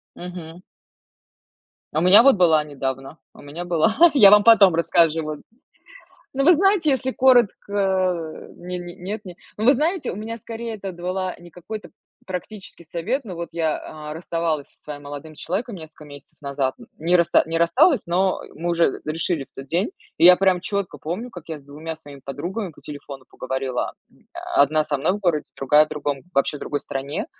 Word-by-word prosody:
Мгм. 175 -1 -9 1.3
А 155 - +1
у - - -1
меня 190 +6 +8
вот 275 -2 +6
была 160 -4 +4
недавно, 135 0 -5 0.2
у - - -15
меня 155 +5 -7
была, 175 +5 +2 0.2
я 205 -8 +8
вам 210 0 +7
потом 210 -6 +7
расскажу, 165 -1 +2
вон. 155 -1 -6 0.9
Ну, 275 +1 +1
вы 350 +4 +7
знаете, 385 -1 +2
если 260 -1 0
коротко, 195 -9 +1
ни 180 +1 -6
ни 175 0 -8
нет, 205 +4 -6
не. 180 -2 -10 0.2
Ну, 215 - -2
вы 265 +4 +6
знаете, 330 +7 -1
у - - -6
меня 225 +2 -6
скорее 230 +1 -6
это 195 -2 -6
давала 185 +2 -4
не 175 0 -14
какой-то 210 +6 -9 0.4
практический 185 -1 -8
совет. 195 - -3
Ну, 190 - -7
вот 170 -1 -6
я, 160 -2 0 0.3
э, - - -5
расставалась 165 -3 -2
со - - -25
своим 145 -1 -8
молодым 145 +2 -9
человеком 200 +9 -4
несколько 160 -2 -12
месяцев 145 -1 -14
назад. 140 -2 -2
Н - - -14
не 170 +3 +3
раст 170 -1 0
не 165 +1 -1
рассталась, 170 - +3
но, 185 +2 +1
э, - - -12
мы 170 +3 -3
уже 170 0 +1
решили 155 -1 -2
в - - -38
тот 135 0 -9
день. 175 - 0 0.3
И - - +2
я 180 0 +9
прям 190 -2 +2
чётко 200 0 -3
помню, 180 +10 -5
как 175 -5 -12
я 160 -2 -5
с 145 - -19
двумя 155 +3 -7
своими 145 -3 -13
подругами 175 - -4
по - - -18
телефону 140 -2 -9
поговорила. 130 -1 -3 0.2
М, - - -27 0.3
одна 155 +2 +4
со 150 -1 -1
мной 155 +7 +1
в 205 - -3
городе, 170 -6 +1
другая 150 +3 +4
в 155 - -18
другом, 145 -2 -3
вообще 140 0 +1
в - - -12
другой 145 -1 -3
стране. 140 +2 -4
170 Hz, 195 wpm, -22 LUFS, 150-195 Hz, 1.3 s, я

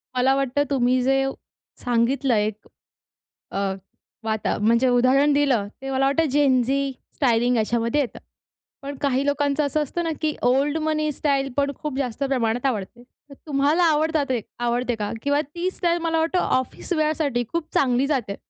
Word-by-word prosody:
मला 265 +2 +3
वाटतं, 275 +1 +1
तुम्ही 255 -2 +2
जे 270 +1 +2
व 270 - -2 0.5
सांगितलं 245 +2 +1
आहे 210 -1 +2
एक 215 0 -8 0.8
अ, - - -4 0.7
वाता 220 -1 -1
म्हणजे 230 +4 +3
उदाहरण 260 +4 +4
दिलं 270 -8 +2 0.2
ते 270 - -4
मला 270 0 +1
वाटतं, 320 +4 +2
जेन 270 -3 +3
झी 275 +2 0 0.2
स्टायलिंग 245 -2 +2
याच्यामध्ये 230 +5 +1
येतं. 260 - -3 0.6
पण 280 +1 -5
काही 275 -1 +1
लोकांचं 285 +1 +1
असं 300 +2 0
असतं 340 +4 -3
ना, 330 - -1
की 310 -1 0
ओल्ड 275 +5 +2
मनी 305 -1 0
स्टाईल, 275 -1 0
पण 280 0 +1
खूप 295 -3 -3
जास्त 255 -1 -3
प्रमाणात 245 -2 0
आवडते. 235 0 -3
तर 280 +3 -19
तुम्हाला 295 +4 +2
आवडतात 310 -1 +1
ते 250 -3 0 0.2
आवडते 240 0 0
का 205 -1 -2
किंवा 285 +1 +2
ती 340 +5 -3
स्टाईल 345 -2 0
मला 325 -1 0
वाटतं 330 +3 +1 0.2
ऑफिस 260 +7 -5
वेअरसाठी 305 -6 0
खूप 335 -2 -2
चांगली 260 0 +2
जाते. 250 -9 -1
275 Hz, 170 wpm, -23 LUFS, 245-295 Hz, 0.8 s, उदाहरण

